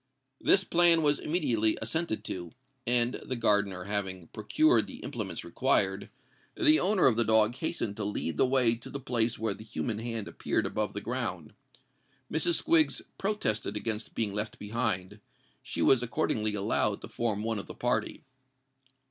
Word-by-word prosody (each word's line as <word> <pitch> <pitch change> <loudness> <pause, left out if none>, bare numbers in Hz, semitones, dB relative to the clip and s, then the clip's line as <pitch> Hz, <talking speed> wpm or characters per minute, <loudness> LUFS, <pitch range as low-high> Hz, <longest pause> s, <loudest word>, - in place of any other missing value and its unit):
This 195 - +4
plan 170 -2 +6
was 145 -1 +3
immediately 115 -10 0
assented 160 -9 -2
to: 85 -2 -6 0.3
and, 120 0 +2
the 130 - -3
gardener 100 -5 +1
having 95 -3 -3
procured 310 - +2
the - - -9
implements - - -5
required, - - +1 0.5
the 315 -2 +5
owner 195 -1 +2
of 120 -4 +4
the 120 - +4
dog 110 0 +3
hastened 125 -6 -3
to 110 - -3
lead 100 -5 -3
the - - +3
way 125 -3 +3
to 115 0 -8
the 140 - -6
place 120 -3 0
where 110 0 -1
the - - -11
human 110 0 -4
hand 115 -2 -4
appeared - - -2
above - - -2
the - - -3
ground. - - -4 0.8
Mrs. 160 +2 +2
Squiggs 155 -4 +3 0.2
protested 115 - -1
against 110 +1 -3
being 105 -3 -1
left 105 +1 -4
behind: 105 -3 -3 0.4
she - - -3
was 130 -3 +5
accordingly 110 -3 -1
allowed 105 0 0
to - - -8
form 110 -3 -2
one 110 -1 -1
of 100 - -8
the - - -8
party. - - -2
115 Hz, 165 wpm, -29 LUFS, 105-135 Hz, 0.8 s, plan